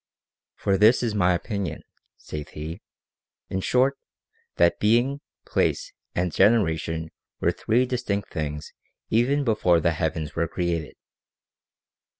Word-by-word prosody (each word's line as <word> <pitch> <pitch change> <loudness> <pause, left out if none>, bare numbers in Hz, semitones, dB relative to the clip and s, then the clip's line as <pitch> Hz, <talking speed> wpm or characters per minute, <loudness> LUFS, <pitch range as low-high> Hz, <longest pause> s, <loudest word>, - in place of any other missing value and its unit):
" - - -68
For 95 -1 +2
this 110 +4 +5
is 115 -3 0
my 90 -3 +3
opinion," 100 0 -4 0.3
saith 75 -1 -7
he, 80 +3 -6 0.3
'; - - -64
in 95 - -1
short, 130 +6 +2 0.6
that 85 0 +3
being, 120 +6 +2 0.2
place, - - 0 0.2
and 90 0 0
generation 80 -6 +2 0.3
were - - +2
three 120 +3 +1
distinct 105 -5 -3
things 75 -2 -4 0.4
even 130 +6 +3
before 105 -8 +3
the 85 +1 +2
heavens 80 -1 -2
were 85 0 0
created." 85 -4 -2
95 Hz, 130 wpm, -25 LUFS, 80-115 Hz, 0.6 s, this